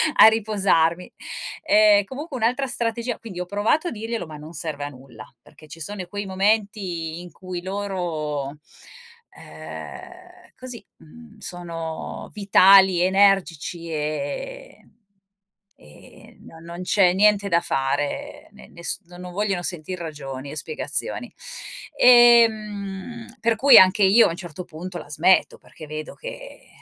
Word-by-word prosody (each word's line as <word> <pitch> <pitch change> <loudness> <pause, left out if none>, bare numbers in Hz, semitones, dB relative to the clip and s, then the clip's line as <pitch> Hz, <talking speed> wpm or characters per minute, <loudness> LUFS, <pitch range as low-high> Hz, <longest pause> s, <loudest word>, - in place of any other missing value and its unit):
a - - +9
riposarmi. 195 -6 +1 0.5
Ehm, 210 -7 +5
comunque 275 - -8
un'altra 250 +3 0
strategia 235 -1 -2
quindi 195 -6 -9
ho 180 - -3
provato 205 - 0
a - - -3
dirglielo 225 -2 -4
ma 155 - -10
non 150 +2 -10
serve 150 -3 -5
a 145 - -4
nulla, 130 -5 -13 0.2
perché 155 - -18
ci 165 - -10
sono 190 +2 -6
quei 205 +1 -5
momenti 190 -4 -1
in 175 -1 -11
cui 185 -2 -7
loro, 170 -8 -4 0.8
ehm 365 0 -11
così, 250 -2 -10
mhmm, 220 +7 -16
sono 165 -4 -6
vitali, 195 -2 +5
energici 180 -4 +1
e 155 - -5 0.9
e 75 0 -18
no 165 - -14
non 170 +2 -8
c'è 180 -1 +3
niente 205 +1 +3
da 170 -2 +3
fare. 135 +1 -3
Ne - - -15
nes 170 0 -5
no 175 0 -14
non 180 0 -9
vogliono 195 -2 -1
sentir 175 +1 -4
ragioni 140 -4 -7
e - - -8
spiegazioni. 460 - -3 0.6
Ehm, 230 -3 +4
per 230 -1 +1
cui 270 +5 +7
anche 190 +3 +5
io 200 +5 +6
a - - -2
un 165 - -4
certo 175 -1 -8
punto 175 +3 -8
la 150 - -12
smetto, 170 +6 +3
perché 155 - -14
vedo 155 +1 -7
che - - -10
190 Hz, 135 wpm, -23 LUFS, 165-220 Hz, 0.9 s, a